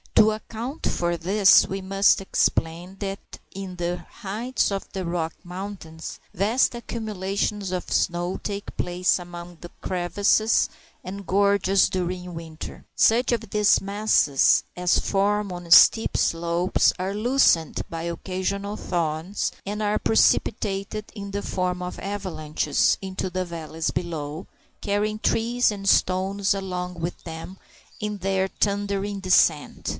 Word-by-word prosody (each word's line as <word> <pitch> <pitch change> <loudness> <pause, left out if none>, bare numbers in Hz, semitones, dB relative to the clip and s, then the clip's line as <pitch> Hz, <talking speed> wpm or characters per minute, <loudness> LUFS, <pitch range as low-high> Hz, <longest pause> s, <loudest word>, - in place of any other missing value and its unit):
To 220 0 +6
account 230 +6 -5
for 175 0 0
this, 195 +4 +5
we 195 0 -4
must 195 +1 +3
explain 175 -1 0
that 195 -1 -3 0.3
in 190 -1 -7
the 175 0 -2
heights 230 +4 -2
of 195 0 -4
the 190 -1 -3
Rocky 170 -1 -2
Mountains 180 -3 -7
vast 215 +9 +2
accumulations 205 -3 -3
of 180 -1 -4
snow 175 +1 0
take 200 -1 -5
place 180 +1 +1
among 175 0 -9
the 175 - -9
crevices 200 +4 +2 0.3
and 195 +2 -7
gorges 200 0 +3
during 180 -1 -3
winter. 165 -1 -8
Such 240 +3 +4
of 225 -3 -1
these 210 0 +4
masses 200 -8 +3
as 180 0 +2
form 200 0 0
on 175 -1 -7
steep 225 +6 +7
slopes 170 +2 +2
are 190 +1 -2
loosened 215 - +3
by 165 0 -5
occasional 190 +4 -3
thaws, 170 +2 -2
and 210 +2 -3
are 210 0 +1
precipitated 210 -1 +1
in 200 -1 -6
the 200 +1 -2
form 180 -1 -2
of 180 0 -5
avalanches 165 -7 0
into 190 -1 -4
the 185 +1 -2
valleys 165 -1 -4
below, 160 -1 -4 0.3
carrying 210 +1 -1
trees 235 +2 +2
and 195 -1 -2
stones 195 +2 +2
along 180 -2 -4
with 170 +1 -4
them 165 +3 -8 0.4
in 210 -1 -3
their 190 0 0
thundering 200 0 -1
descent. 180 -5 +2
190 Hz, 130 wpm, -24 LUFS, 175-205 Hz, 0.4 s, steep